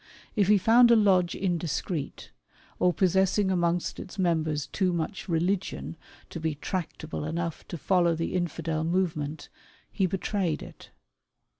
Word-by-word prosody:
If 205 -4 +3
he 210 0 +6
found 235 +5 +6
a 235 - +7
lodge 185 -5 +3
indiscreet, 170 -3 -3 0.5
or 180 - +4
possessing 190 +2 +2
amongst 175 -1 0
its 195 - -9
members 160 -5 0
too 185 -2 0
much 175 +4 -4
religion 175 +1 -1 0.4
to - - -5
be 160 -2 -2
tractable 160 -1 -4
enough 165 +1 -4
to 170 - -6
follow 175 0 +2
the 165 +1 -3
Infidel 165 -3 -2
movement, 160 -4 -1 0.4
he 190 -3 +1
betrayed 185 -2 -1
it. - - -13
175 Hz, 135 wpm, -27 LUFS, 160-190 Hz, 0.5 s, a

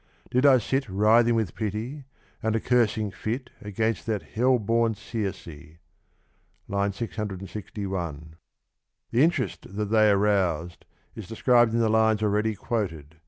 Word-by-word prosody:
did 130 +3 +4
I 135 -2 +7
sit 135 +1 -1
Writhing 110 +4 +4
with 110 -8 -1
pity, 115 +7 -4 0.4
and 110 0 0
a - - +2
cursing 110 -3 +1
fit 115 +6 -4
Against 110 +3 -2
that 105 -3 -1
hell 125 +3 +2
born 115 +1 +1
Circe. 100 -3 -5
(III. 80 0 -12 1.1
661) 95 -6 -5 0.8
The 120 - +3
interest 155 -6 0
that 105 0 -2
they 110 -1 +5
roused 90 -5 0 0.3
is 110 -5 -9
described 120 0 +3
in - - +2
the 115 - +3
lines 110 -1 +2
already 105 +1 +1
quoted 90 - -3
(p. 80 - -25
110 Hz, 135 wpm, -26 LUFS, 95-115 Hz, 1.1 s, I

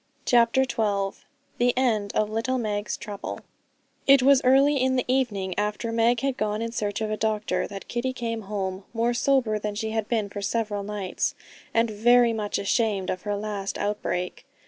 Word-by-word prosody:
CHAPTER 240 +2 +4
XII 205 -6 -1 0.4
The 245 +1 +2
End 220 -6 +1
of 215 - +2
Little 225 +4 -1
Meg's 210 -3 -2
Trouble 205 -2 -6 0.7
It 275 -1 +7
was 275 0 +6
early 275 +3 +5
in 260 0 +2
the 255 - 0
evening 220 -8 0
after 210 +2 -2
Meg 230 +1 +2
had 270 -2 -1
gone 215 0 -1
in 230 0 -3
search 210 -2 -2
of 215 -1 -1
a 215 - -1
doctor, 215 -1 -1
that 195 -1 -8
Kitty 240 +2 -2
came 230 -3 -3
home, 190 -2 -3
more 235 +1 +1
sober 240 -4 +2
than 210 0 -4
she 220 +1 -3
had 220 -1 -1
been 220 -4 0
for 205 0 -7
several 205 0 -1
nights, 200 -2 -2 0.4
and 230 0 +2
very 235 +2 +4
much 210 -2 -2
ashamed 200 -2 0
of 185 - -4
her 205 +1 -2
last 205 -1 -4
outbreak. 205 -3 -3
220 Hz, 180 wpm, -25 LUFS, 205-240 Hz, 0.7 s, It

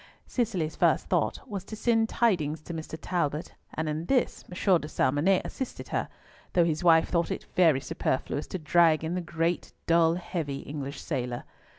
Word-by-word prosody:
Cicely's 190 - -1
first - - +2
thought - - 0
was 200 -6 -4
to 215 - -7
send 225 0 +2
tidings 160 -10 +1
to 170 - -7
Mr. 160 0 -6
Talbot, 155 -3 -2 0.2
and 160 0 -2
in 155 +2 -2
this 260 -2 +1
M. 180 0 +3
de 150 - -6
Salmonnet 155 +6 +2
assisted 265 - -6
her, - - -1 0.4
though 175 -2 +4
his 160 0 -1
wife 165 -2 +5
thought 170 -2 +1
it - - -4
very 165 -7 +5
superfluous 130 +2 -2
to - - -4
drag 165 -1 +4
in 160 +2 -2
the 180 - -1
great, 165 0 -2
dull, 165 0 +4
heavy, 165 -6 -4
English 140 -1 -6
sailor. 125 -1 -3
165 Hz, 175 wpm, -28 LUFS, 150-180 Hz, 0.4 s, wife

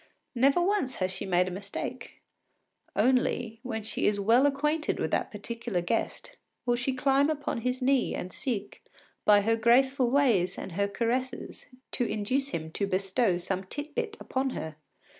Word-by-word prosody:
Never 275 +5 +4
once 365 -9 +1
has 185 0 -1
she 190 +1 -5
made 180 0 +3
a - - -3
mistake. 200 +2 -6 0.7
Only, 245 -3 +1
when 225 -3 -4
she 220 - -1
is 205 -1 +1
well 235 +7 +5
acquainted 300 +3 0
with - - -1
the - - +1
particular 230 -1 -4
guest, 230 - -2 0.4
she 245 +2 -1
will - - -7
climb 275 +2 +3
upon 290 -6 -2
his 250 +2 -1
knee 270 -1 +2
and 180 - -5
seek, 215 -6 -4 0.4
by 205 -1 +7
her 225 +3 +2
graceful 250 +3 +4
ways 240 -10 +3
and - - -6
her 200 +4 0
caresses, 240 +5 -3 0.2
to - - 0
induce 255 +6 -1
him 160 - -4
to 200 +4 -1
bestow 195 +1 +1
some 185 +2 -3
tit 290 +9 -6
bit 450 -3 -3
upon 265 +1 -1
her. 160 -1 -5
235 Hz, 165 wpm, -29 LUFS, 200-270 Hz, 0.7 s, by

